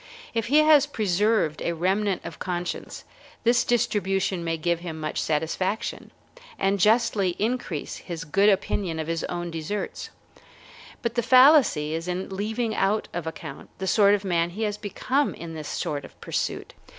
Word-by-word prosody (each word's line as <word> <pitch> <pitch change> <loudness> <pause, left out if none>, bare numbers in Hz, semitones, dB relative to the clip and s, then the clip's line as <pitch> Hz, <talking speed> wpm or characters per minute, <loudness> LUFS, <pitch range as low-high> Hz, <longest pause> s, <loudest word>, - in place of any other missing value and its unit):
If 230 -2 -1
he 295 +5 +5
has 300 -2 +6
preserved 210 - +1
a 170 - -1
remnant 190 +3 0
of 170 - -8
conscience, 175 -1 -4 0.4
this 240 +1 +4
distribution 195 -6 0
may 165 -1 -1
give 170 +1 0
him 165 -2 -6
much 155 -1 -2
satisfaction, 165 +7 -2 0.5
and 195 +1 +1
justly 210 -3 +3
increase 215 - -2
his 165 -2 -6
good 195 +6 +3
opinion 190 -3 0
of 160 - -3
his 165 +1 -2
own 175 -1 -4
deserts; 165 +6 -4 0.9
but 235 -1 -1
the 240 - +1
fallacy 255 - +5
is 165 +2 -3
in 180 +1 -3
leaving 220 +4 -2
out 210 +1 0
of 170 -2 -4
account 160 - -8
the 190 - -4
sort 200 +1 +5
of 200 0 -5
man 170 -2 +1
he 205 +6 -4
has 210 -1 -1
become 255 +7 -1
in 165 -1 -8
this 155 -2 -6
sort 145 -2 -3
of - - -14
pursuit. - - -3
190 Hz, 165 wpm, -25 LUFS, 170-220 Hz, 0.9 s, has